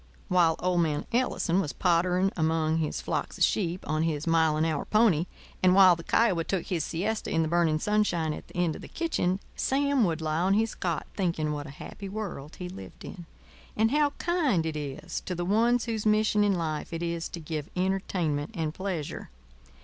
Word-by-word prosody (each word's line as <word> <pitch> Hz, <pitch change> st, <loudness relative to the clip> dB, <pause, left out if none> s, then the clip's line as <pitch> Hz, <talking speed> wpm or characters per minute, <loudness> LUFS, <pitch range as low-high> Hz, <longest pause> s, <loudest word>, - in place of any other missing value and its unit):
While 170 Hz, -3 st, +4 dB
old 180 Hz, -1 st, +1 dB
man 150 Hz, -3 st, 0 dB
Ellison 215 Hz, -7 st, +1 dB
was 150 Hz, -, -4 dB
pottering 180 Hz, +2 st, +2 dB
among 160 Hz, -1 st, +1 dB
his 155 Hz, -2 st, -1 dB
flocks -, -, -3 dB
of -, -, +2 dB
sheep 180 Hz, -3 st, 0 dB
on 155 Hz, 0 st, 0 dB
his 155 Hz, -2 st, -1 dB
mile 160 Hz, -2 st, +3 dB
an 155 Hz, -, +2 dB
hour 155 Hz, -3 st, -1 dB
pony, 210 Hz, -7 st, +3 dB, 0.3 s
and 185 Hz, 0 st, +5 dB
while 190 Hz, -2 st, +8 dB
the 165 Hz, -, -8 dB
Kiowa 190 Hz, -4 st, +2 dB
took 180 Hz, +1 st, -2 dB
his 175 Hz, -4 st, -1 dB
siesta 205 Hz, +7 st, -2 dB
in 165 Hz, 0 st, +2 dB
the -, -, -1 dB
burning 165 Hz, -1 st, +2 dB
sunshine 175 Hz, -5 st, +1 dB
at -, -, -9 dB
the -, -, -17 dB
end 175 Hz, -3 st, +1 dB
of -, -, -9 dB
the -, -, -9 dB
kitchen, 195 Hz, -, -1 dB, 0.2 s
Sam 280 Hz, -1 st, +2 dB
would 165 Hz, -3 st, -1 dB
lie 155 Hz, 0 st, -1 dB
on 190 Hz, +3 st, +3 dB
his 225 Hz, +1 st, +1 dB
cot 170 Hz, -4 st, -2 dB
thinking 165 Hz, -5 st, 0 dB
what 145 Hz, 0 st, -5 dB
a -, -, -9 dB
happy 195 Hz, +7 st, -8 dB
world 190 Hz, -8 st, -6 dB
he 180 Hz, -, -6 dB
lived 185 Hz, +2 st, -10 dB
in, 175 Hz, -4 st, -9 dB, 0.5 s
and 220 Hz, +2 st, +3 dB
how 295 Hz, 0 st, +3 dB
kind 300 Hz, -, +1 dB
it 160 Hz, -1 st, -3 dB
is 150 Hz, +3 st, -5 dB
to 180 Hz, -, -2 dB
the 175 Hz, 0 st, -3 dB
ones 230 Hz, +5 st, +2 dB
whose 225 Hz, -3 st, -2 dB
mission 215 Hz, -1 st, +3 dB
in 200 Hz, -2 st, +3 dB
life 155 Hz, -3 st, -3 dB
it 165 Hz, 0 st, -3 dB
is 170 Hz, -1 st, -2 dB
to 170 Hz, -, -7 dB
give 155 Hz, -2 st, -5 dB
entertainment 180 Hz, -5 st, -1 dB
and 160 Hz, -2 st, -2 dB
pleasure. 180 Hz, -5 st, -4 dB
175 Hz, 205 wpm, -28 LUFS, 160-200 Hz, 0.5 s, while